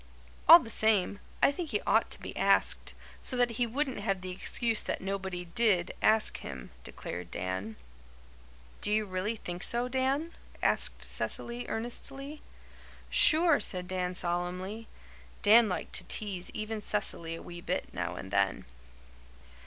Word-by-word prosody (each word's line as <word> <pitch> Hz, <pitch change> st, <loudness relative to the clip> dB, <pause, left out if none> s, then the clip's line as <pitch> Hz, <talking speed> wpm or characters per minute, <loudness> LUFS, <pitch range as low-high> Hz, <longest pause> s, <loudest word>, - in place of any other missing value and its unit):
"All 335 Hz, -, +13 dB
the 235 Hz, -9 st, -7 dB
same, 210 Hz, -2 st, +3 dB, 0.2 s
I -, -, +6 dB
think 320 Hz, +2 st, -5 dB
he 210 Hz, -5 st, 0 dB
ought -, -, +2 dB
to -, -, 0 dB
be -, -, -8 dB
asked, -, -, +2 dB, 0.3 s
so 255 Hz, -, -1 dB
that 245 Hz, -1 st, +3 dB
he 235 Hz, +1 st, -1 dB
wouldn't 265 Hz, 0 st, -2 dB
have 195 Hz, -2 st, -2 dB
the 185 Hz, 0 st, -5 dB
excuse 225 Hz, +4 st, 0 dB
that -, -, -3 dB
nobody 190 Hz, -2 st, -4 dB
DID 185 Hz, -1 st, +2 dB
ask 220 Hz, 0 st, +4 dB
him," 65 Hz, -3 st, -8 dB
declared 90 Hz, -1 st, -7 dB
Dan. 95 Hz, +4 st, -4 dB, 1.1 s
"Do 210 Hz, -, -1 dB
you 215 Hz, 0 st, +2 dB
really 190 Hz, +3 st, -3 dB
think 175 Hz, -4 st, -7 dB
so, 240 Hz, +4 st, +3 dB
Dan?" 265 Hz, +5 st, -1 dB, 0.3 s
asked -, -, 0 dB
Cecily 240 Hz, +1 st, -2 dB
earnestly. 275 Hz, +5 st, -5 dB, 0.7 s
"Sure," 325 Hz, -2 st, +6 dB
said 180 Hz, -4 st, -3 dB
Dan, 185 Hz, -1 st, -2 dB
solemnly. 180 Hz, +5 st, -3 dB, 0.6 s
Dan 220 Hz, +1 st, +7 dB
liked 180 Hz, -, -4 dB
to -, -, -1 dB
tease 195 Hz, -4 st, -1 dB
even 215 Hz, 0 st, -5 dB
Cecily 170 Hz, -6 st, -1 dB
a -, -, -9 dB
wee 175 Hz, 0 st, -9 dB
bit -, -, -3 dB
now -, -, -3 dB
and 95 Hz, -, -8 dB
then. 100 Hz, -1 st, 0 dB
210 Hz, 150 wpm, -30 LUFS, 180-235 Hz, 1.1 s, All